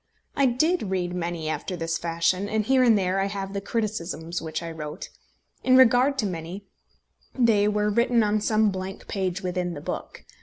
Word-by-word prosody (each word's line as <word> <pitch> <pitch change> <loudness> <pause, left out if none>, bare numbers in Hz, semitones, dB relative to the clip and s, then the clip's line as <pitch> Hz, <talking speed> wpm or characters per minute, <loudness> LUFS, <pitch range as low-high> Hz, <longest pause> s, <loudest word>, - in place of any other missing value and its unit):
I 275 - +4
did 260 - +1
read 180 -2 -1
many 170 -2 -3
after 170 +4 -3
this 165 -1 -2
fashion, 170 +4 0
and 215 -1 0
here 265 +2 +4
and 235 -4 +5
there 190 0 0
I 195 - +1
have 195 -1 -5
the 200 - -3
criticisms 175 -6 -3
which 160 +1 -4
I 165 - -5
wrote. 150 -2 -7 0.5
In 255 0 +5
regard 260 +2 +5
to 230 - 0
many, 180 +2 -5 0.7
they 220 -5 +4
were 210 0 +1
written 235 +1 +3
on 210 0 +1
some 215 0 +2
blank 190 0 -6
page 190 -2 -2
within 180 -1 -2
the - - -6
book. - - -6
195 Hz, 185 wpm, -25 LUFS, 175-220 Hz, 0.7 s, and